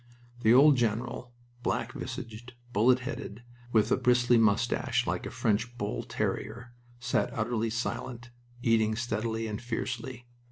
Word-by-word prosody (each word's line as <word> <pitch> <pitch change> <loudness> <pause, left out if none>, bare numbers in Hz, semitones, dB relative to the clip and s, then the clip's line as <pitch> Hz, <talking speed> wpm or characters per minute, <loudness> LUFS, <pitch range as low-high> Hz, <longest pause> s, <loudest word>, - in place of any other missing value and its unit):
The 110 -2 +4
old 140 +3 +7
general, 120 +1 -1 0.3
black - - -1
visaged, 115 +2 -7 0.2
bullet 125 +4 +4
headed, 125 -4 -6 0.3
with 110 -3 +3
a - - +4
bristly 120 -1 +4
mustache 110 -2 +2
like - - -2
a - - -4
French 115 +3 -1
bull 105 -2 -2
terrier, 120 0 -3 0.3
sat 120 0 0
utterly 115 0 0
silent, 120 +1 -4 0.3
eating 110 -2 +3
steadily 115 -1 -2
and 105 -1 -4
fiercely. 120 +1 -4
120 Hz, 130 wpm, -29 LUFS, 110-120 Hz, 0.3 s, old